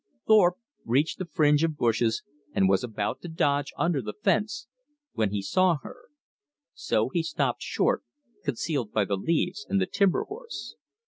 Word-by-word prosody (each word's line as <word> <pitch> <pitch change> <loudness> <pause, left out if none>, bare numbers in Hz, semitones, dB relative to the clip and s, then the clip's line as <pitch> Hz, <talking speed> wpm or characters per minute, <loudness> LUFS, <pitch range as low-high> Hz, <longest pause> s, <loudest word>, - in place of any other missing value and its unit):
Thorpe 190 -5 +5 0.3
reached 135 +7 +1
the 185 - -4
fringe 150 0 +4
of 160 -2 0
bushes, 115 -2 +1 0.3
and 95 - +4
was 95 +2 +3
about 110 -3 -3
to - - -7
dodge 145 -3 0
under 170 -5 +1
the 105 -2 -6
fence, 215 +6 +1 0.5
when 110 -2 +1
he 100 0 -3
saw 180 - +3
her. - - -11 0.7
So 295 - 0
he 175 - 0
stopped 165 - -1
short, - - +1 0.4
concealed 140 -3 -2
by 105 -2 +2
the 100 - 0
leaves 170 - -1
and 195 - +2
the 190 - +2
timber 195 0 +2
horse. 465 +3 -8
155 Hz, 160 wpm, -27 LUFS, 115-185 Hz, 0.7 s, Thorpe